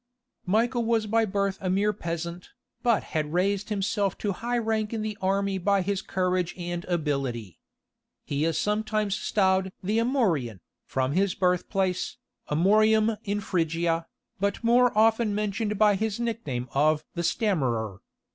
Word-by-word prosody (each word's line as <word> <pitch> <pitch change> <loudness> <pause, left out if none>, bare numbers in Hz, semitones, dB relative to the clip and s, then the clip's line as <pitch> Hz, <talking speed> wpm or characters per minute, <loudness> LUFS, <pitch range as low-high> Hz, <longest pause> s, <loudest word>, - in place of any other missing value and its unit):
Michael 230 +5 +2
was 225 -1 +1
by 225 +1 +2
birth 200 -1 -1
a 185 - -1
mere 205 +3 +2
peasant, 170 0 -5 0.3
but 235 -3 +2
had 155 -1 -1
raised 195 +3 +1
himself 200 -1 0
to 205 - -1
high 240 +5 -2
rank 220 -1 -1
in 220 -1 -2
the 215 -1 -3
army 195 0 0
by 195 +1 +2
his 200 0 -1
courage 185 -2 -1
and 175 -1 -4
ability. 140 - -2 0.7
He 145 +1 -1
is 165 0 +1
sometimes 210 -1 0
styled 190 -3 +1
"the 210 +4 +1
Amorian," 185 - +1 0.3
from 130 0 0
his 190 +4 +1
birth 180 -1 +1
place, 190 -2 -1 0.3
Amorium 215 +7 +4
in 205 0 -1
Phrygia, 165 -2 0 0.3
but 200 +2 -1
more 245 +1 +5
often 220 -1 +3
mentioned 210 0 -1
by 210 0 +5
his 215 +2 -2
nickname 220 - -3
of 150 +2 +2
"the 170 - -2
Stammerer." 130 - 0
195 Hz, 145 wpm, -27 LUFS, 170-215 Hz, 0.7 s, more